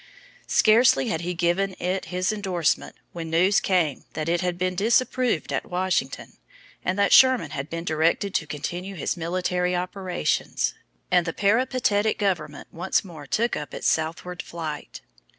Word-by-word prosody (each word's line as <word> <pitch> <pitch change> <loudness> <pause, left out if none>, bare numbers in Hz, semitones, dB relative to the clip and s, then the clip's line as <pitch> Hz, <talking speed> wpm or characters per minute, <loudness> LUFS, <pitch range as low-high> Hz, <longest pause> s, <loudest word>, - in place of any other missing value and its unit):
Scarcely 215 - +4
had 160 - -1
he 175 +1 -3
given 180 +3 0
it 185 +1 -2
his 185 +2 -1
indorsement 190 -6 -1 0.2
when 165 -1 -6
news 180 +5 +4
came 175 -7 0
that 155 0 -3
it 170 +1 +1
had 180 -1 -1
been 185 0 0
disapproved 235 +1 +1
at - - -3
Washington, 180 -7 -2 0.5
and 180 +2 -1
that 200 0 +3
Sherman 260 -2 +6
had 140 +2 -5
been 165 0 -4
directed 165 +4 +1
to 155 - 0
continue 175 +6 -5
his - - -2
military 180 +1 -1
operations; 180 - -1 0.4
and 180 -1 +3
the 165 - -2
peripatetic 220 -1 +1
government 190 -6 -2
once 185 +4 0
more 155 -6 -10
took 235 - 0
up 150 - -6
its - - -6
southward 170 +3 -1
flight. 155 -3 -7
180 Hz, 150 wpm, -25 LUFS, 165-195 Hz, 0.5 s, Sherman